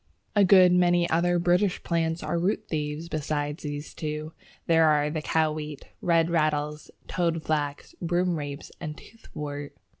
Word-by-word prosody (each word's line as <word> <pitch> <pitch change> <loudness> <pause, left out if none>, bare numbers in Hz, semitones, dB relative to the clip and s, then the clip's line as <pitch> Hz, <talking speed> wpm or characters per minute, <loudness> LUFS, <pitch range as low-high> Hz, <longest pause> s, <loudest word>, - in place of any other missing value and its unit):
A 205 - +6
good 185 -1 +7
many 175 -1 +4
other 175 +2 +3
British 180 +2 +2
plants 165 -1 -1
are 170 - -1
root 200 +4 0
thieves. 150 +1 -3
Besides 150 -1 -2
these 145 0 -5
two, 155 0 -5 0.3
there 165 -1 +5
are 150 0 +2
the 155 0 -2
Cow 160 0 +1
wheat, 150 -2 -6 0.2
Red 165 -1 +2
Rattles, 150 -2 0 0.2
Toadflax, 155 -4 -1
Broomrapes, 170 -5 -1
and 150 0 -6
Toothwort. 145 -9 -8
160 Hz, 140 wpm, -27 LUFS, 150-175 Hz, 0.3 s, good